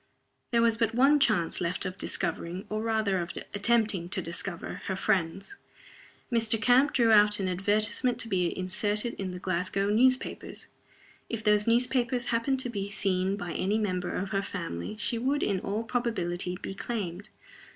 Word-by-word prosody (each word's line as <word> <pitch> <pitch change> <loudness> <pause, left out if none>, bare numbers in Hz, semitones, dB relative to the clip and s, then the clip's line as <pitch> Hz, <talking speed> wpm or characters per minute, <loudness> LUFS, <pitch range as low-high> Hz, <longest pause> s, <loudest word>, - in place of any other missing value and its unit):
There 235 -1 +3
was 230 -1 +3
but 225 0 0
one 275 +4 +5
chance 205 -11 +2
left 180 +3 -1
of 185 -1 -4
discovering 175 0 -3
or 215 0 -2
rather 220 -4 0
of 170 0 -4 0.2
attempting 205 -4 +2
to 190 +1 +1
discover 170 +1 -5
her 190 - -2
friends. 190 - -1 0.7
Mr. 225 -1 +2
Camp 250 +6 +4
drew 235 -3 +3
out 210 -1 +5
an 190 - -1
advertisement 215 +6 +2
to - - -4
be 180 -5 0
inserted 205 +5 -1
in 195 -1 -3
the 180 - -6
Glasgow 185 +2 -1
newspapers. 255 +4 +1 0.6
If 225 -1 -4
those 210 0 +3
newspapers 245 +1 +2
happened 260 +4 +1
to 250 - -4
be 200 -2 -4
seen 195 -1 0
by 175 -4 -5
any 200 +3 0
member 185 -4 -2
of 190 +1 -3
her 195 - +1
family, 180 - -5
she 225 +2 0
would, 275 +4 0
in 195 -2 0
all 205 +4 -3
probability, 185 -7 -2
be - - -6
claimed. 200 -3 -5
205 Hz, 165 wpm, -28 LUFS, 185-230 Hz, 0.7 s, one